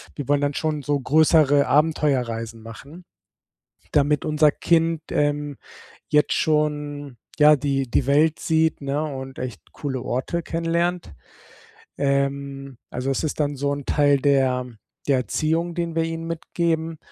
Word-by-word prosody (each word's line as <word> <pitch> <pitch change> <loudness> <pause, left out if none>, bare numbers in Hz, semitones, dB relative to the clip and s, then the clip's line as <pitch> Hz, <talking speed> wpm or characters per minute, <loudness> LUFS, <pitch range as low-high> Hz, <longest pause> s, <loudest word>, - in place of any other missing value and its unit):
wir 145 - -6
wollen 145 0 +2
dann 145 0 0
schon 155 -2 -1
so 145 +1 0
größere 145 0 +4
Abenteuerreisen 125 -7 0
machen, 140 +10 -12 0.9
damit 145 0 +2
unser 155 0 +4
Kind, 165 0 +1
ähm, 145 -1 -1 0.5
jetzt 150 -1 +3
schon 145 -3 -1 0.2
ja, 150 0 +7
die 135 -2 -1
die 135 - +2
Welt 150 +3 +3
sieht, 160 -1 +1
ne, 140 +1 -1
und 135 -3 -6
echt 125 -5 -6
coole 135 -3 -4
Orte 130 +8 -2
kennenlernt. 170 - -1 0.8
Ähm, 140 -1 -2
also 125 +2 -3
es 135 - -1
ist 155 - -3
dann 145 -1 0
so 140 +1 -1
'n 140 -1 -6
Teil 145 -1 +3
der 130 -2 +2 0.4
der 140 -2 +3
Erziehung, 160 - -1
den 170 -2 -3
wir 165 - +2
ihm 165 0 -4
mitgeben. 165 -1 -2
145 Hz, 140 wpm, -23 LUFS, 140-160 Hz, 0.9 s, ja